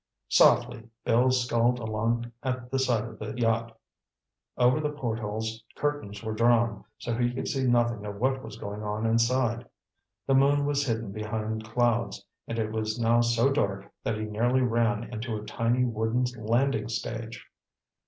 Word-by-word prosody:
Softly 120 -1 +4 0.2
Bill 120 +3 +4
sculled 125 -1 +2
along 115 +1 -1
at 125 -2 -3
the 135 - +1
side 120 -5 +2
of 115 -2 -9
the 105 +2 -5
yacht. 115 -1 0 0.8
Over 125 +4 +4
the 150 -1 0
portholes 110 -5 -3
curtains 145 -9 -3
were 110 -1 -3
drawn, 115 -1 +2
so 120 - -3
he 120 +1 +1
could 125 - -4
see 135 -2 0
nothing 120 -3 +2
of 100 - -5
what 130 +5 0
was 110 -4 -9
going 105 -1 -6
on 105 +1 -2
inside. 115 +1 +1 0.6
The 135 - +2
moon 140 +1 +4
was 145 0 0
hidden 115 -3 -2
behind 110 +1 -3
clouds, 115 -3 0 0.2
and 115 - -4
it 110 -1 -1
was 110 +1 -2
now 120 +1 +4
so 120 +3 +3
dark 100 -8 -1
that 110 - -1
he 110 - -3
nearly 120 +5 +1
ran 115 -1 +1
into 110 0 -3
a 105 - -8
tiny 115 +3 +1
wooden 115 +1 0 0.2
landing 125 +1 +1
stage. 115 +1 -5
115 Hz, 165 wpm, -28 LUFS, 110-125 Hz, 0.8 s, Softly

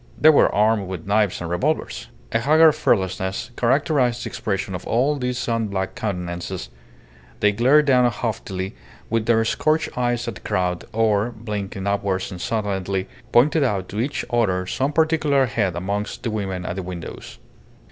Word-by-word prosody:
They 155 - +7
were 145 - +5
armed 105 -1 +2
with 90 -3 -6
knives 105 -2 +1
and 85 - -4
revolvers. 145 - -1 0.2
A 115 - +2
haggard 155 +5 +6
fearlessness 95 - -1
characterized 125 -1 +1
the - - -3
expression 100 -3 -3
of 90 - -6
all 130 +6 +2
these 125 -2 -2
sun 115 -3 -1
blacked 95 -2 -3
countenances; 90 - -4 0.7
they 105 - +4
glared 130 +8 +4
down 125 -3 +4
haughtily 100 -4 -4 0.4
with 115 -1 0
their 115 -1 +3
scorched 155 +6 0
eyes 120 -1 0
at 115 - -2
the - - -12
crowd, 90 -1 -1
or, 110 -1 +2
blinking 105 -4 -5
upwards 100 -2 -1
insolently, 95 -1 -2 0.2
pointed 145 +5 +4
out 100 -8 0
to 105 - -4
each 135 +5 -2
other 95 -6 +1
some 130 +9 -1
particular 155 -3 +2
head 105 -6 -1
amongst 100 +4 -3
the 115 - -1
women 95 -4 -3
at 90 - -4
the - - -2
windows. 90 -2 -8
110 Hz, 160 wpm, -22 LUFS, 95-125 Hz, 0.7 s, They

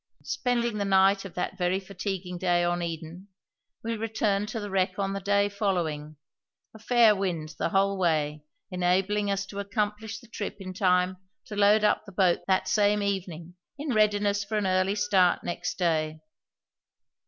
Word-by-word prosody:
Spending 240 -5 -1
the - - 0
night 195 0 +3
of 195 - -9
that 180 - -3
very 180 +1 +1
fatiguing 190 -2 -5
day 175 -1 +2
on 175 0 0
Eden, 170 +2 -6 0.6
we 230 0 -2
returned 215 -2 -1
to 225 - -4
the 205 -2 -6
wreck 185 -1 0
on 195 -1 -1
the 195 - -3
day 200 +1 +2
following, 170 -7 -2 0.6
a 220 - -13
fair 230 -1 +5
wind 175 -6 -2
the - - 0
whole 195 +1 +1
way 155 -4 0 0.3
enabling 190 +3 +1
us 195 0 -1
to 200 +1 -8
accomplish 210 +1 -2
the 235 - -14
trip 210 -2 -5
in 185 -1 -7
time 180 -1 +2 0.3
to 210 - -8
load 205 +1 +4
up 210 - +2
the - - -9
boat 185 -2 +2
that 190 -1 +2
same 210 -1 +2
evening 180 -4 -3 0.2
in 285 -2 -3
readiness 205 -1 +2
for 215 +2 -3
an 210 - 0
early 185 +1 +1
start 200 -4 +2
next 175 - -4
day. 155 -3 0
195 Hz, 170 wpm, -27 LUFS, 180-205 Hz, 0.6 s, fair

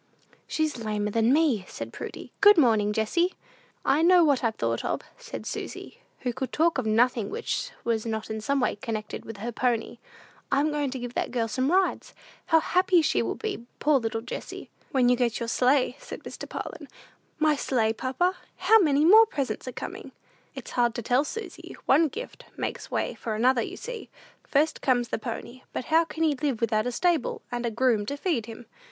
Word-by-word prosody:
"She's 310 -5 -1
lamer 210 -1 -1
than 225 +2 +3
me," 285 - +3
said - - -7
Prudy. - - -8
"Good 410 -1 +8
morning, 220 -8 +4
Jessie." 280 - +1 0.5
"I 285 +3 +3
know 350 +1 +6
what 285 -5 +2
I've 225 -2 +1
thought 115 0 -1
of," - - -1 0.2
said - - -8
Susy, 475 - -6 0.2
who 250 -2 -1
could 260 +1 -4
talk 325 -2 +2
of 235 - -2
nothing 225 -1 +2
which - - -3
was 230 -2 0
not 220 0 -3
in 220 0 -3
some 275 +6 0
way 250 - 0
connected 215 0 -5
with 225 - -8
her 230 +4 -4
pony. 240 -1 -1 0.5
"I'm 285 +3 +2
going 295 -2 -1
to 260 - -5
give 245 -1 -6
that - - -1
girl 235 -2 -1
some 255 +6 0
rides. 380 +1 +1 0.3
How 325 -1 +5
happy 365 0 +3
she - - +2
will - - -2
be, 400 - -5
poor 295 -1 +3
little 225 -1 -2
Jessie!" 250 - -7 0.2
"When 260 -4 +3
you 250 - +5
get 240 -2 0
your 235 - -3
sleigh," 250 +2 +2
said - - -9
Mr. - - -8
Parlin. - - -6 0.5
"My 310 -1 +3
sleigh, 230 -5 +1
papa? 270 +11 0 0.2
How 430 +5 +5
many 300 -5 +3
more 440 +6 +8
presents 275 - -3
are - - -3
coming?" - - -7 0.4
"It - - -8
is - - -8
hard 240 -2 +2
to 235 - -4
tell, 250 +5 +3
Susy; 430 +8 -7
one 310 +4 +5
gift 460 - -8
makes - - -4
way - - -1
for 220 -3 -4
another, 245 +2 +3
you - - -5
see. 485 -2 -7 0.3
First 300 +3 +1
comes 245 -3 +1
the - - -2
pony; 235 +2 -6
but 255 - -3
how 330 +1 +6
can 325 0 -3
he 310 -2 +3
live 275 -4 -2
without 220 0 +1
a - - -1
stable, 330 +3 0
and 240 0 -2
a - - +1
groom 230 -2 +1
to 285 - -3
feed 285 - -1
him? 230 +1 -9
255 Hz, 200 wpm, -27 LUFS, 230-310 Hz, 0.5 s, Good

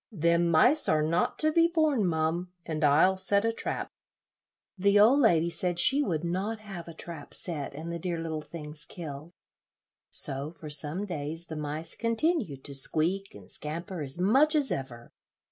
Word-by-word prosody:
"Them 170 -2 +1
mice 250 - +5
are 155 -1 +2
not 165 +3 0
to 310 0 +1
be 335 +1 +4
borne, 310 - +1
mum, 165 +2 -1
and 155 -1 -4
I'll 160 +6 +4
set 200 +2 +2
a 230 - 0
trap." - - -3 0.8
The 200 +1 +3
old 235 +7 +6
lady 170 - +3
said 175 0 -1
she 270 +11 +6
would 170 - -2
not 190 +6 -3
have 195 -6 -9
a 165 - -9
trap 165 -3 -8
set, 150 -6 -5
and 160 +3 -6
the 170 - -5
dear 175 0 -3
little 160 -1 -4
things 150 -1 -2
killed, 155 -1 -8 0.8
so 140 +2 +2
for 160 -2 -10
some 150 +6 +1
days 165 -2 -5
the 160 - -8
mice 150 +2 -2
continued 230 - -1
to 140 - -8
squeak 165 +8 +1
and 100 -3 -13
scamper 165 - -6
as 135 0 -3
much 265 - +3
as 290 -3 +2
ever. 120 -3 -6
170 Hz, 175 wpm, -28 LUFS, 155-200 Hz, 0.8 s, old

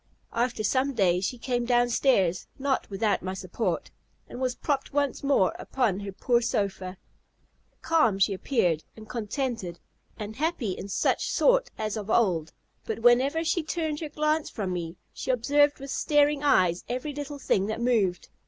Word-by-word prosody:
After 235 -1 0
some 260 +6 +1
days 185 -3 +2
she 250 - -3
came 245 0 -1
down 240 0 +3
stairs, 195 -9 +2
not 270 -1 -1
without 205 +1 0
my 185 +1 -4
support, 190 +4 -3 0.4
and 250 - -8
was 255 -1 0
propped 280 -2 -2
once 285 -1 0
more 275 -9 +3
upon 225 -8 0
her 200 -1 -5
poor 235 +5 +1
sofa. 195 -5 -2 0.9
Calm 310 -12 +3
she 195 +1 +3
appeared, 180 - 0
and 215 0 -11
contented, 225 - -3 0.4
and 215 +1 -6
happy 300 - -1
in 190 - -6
such 195 - 0
sort - - +3
as 215 0 -2
of 210 0 -6
old; 175 -9 +2 0.3
but 225 0 -5
whenever 260 +7 +4
she 340 +1 +1
turned 315 -1 -2
her 310 - -5
glance 305 +1 0
from 195 -5 -3
me, 170 -1 -4 0.2
she - - -6
observed 285 +4 +3
with 275 0 -7
starting 295 0 +2
eyes 180 -11 +3
every 255 +4 -3
little 290 0 -6
thing 200 -7 +1
that 220 +1 -3
moved. 220 -7 +1
240 Hz, 165 wpm, -27 LUFS, 195-280 Hz, 0.9 s, whenever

